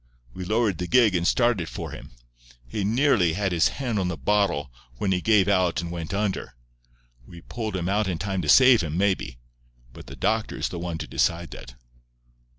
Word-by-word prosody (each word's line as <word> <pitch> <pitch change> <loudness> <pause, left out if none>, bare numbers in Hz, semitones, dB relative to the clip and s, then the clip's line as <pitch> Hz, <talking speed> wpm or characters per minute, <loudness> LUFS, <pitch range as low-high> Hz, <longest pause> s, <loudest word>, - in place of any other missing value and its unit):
We 95 - -7
lowered 110 -3 0
the 90 - -3
gig 120 -3 +4
and 85 -1 0
started 115 -9 +1
for - - -6
him. - - -10 0.6
He 100 - -3
nearly 110 - +2
had 95 +1 -1
his 85 -2 +3
hand 120 -6 -3
on 95 - -1
the 90 -2 -3
bottle, 75 -4 0 0.3
when 95 - -1
he 90 -1 0
gave 105 -3 +3
out 95 -4 +2
and 85 0 -5
went 85 -2 -5
under. 100 -10 -2 0.7
We 85 -1 -12
pulled 110 -1 -5
him 90 -2 -2
out 105 +1 +1
in 90 -3 -2
time 95 +1 -3
to 75 - -4
save 125 - +7
him, 80 -1 -3
maybe; 95 -10 0 0.6
but - - -12
the - - -9
doctor 110 0 -1
is - - -2
the 85 - -6
one 85 -1 -4
to 80 - -5
decide 85 -2 -1
that." - - -11
95 Hz, 200 wpm, -25 LUFS, 85-105 Hz, 0.7 s, save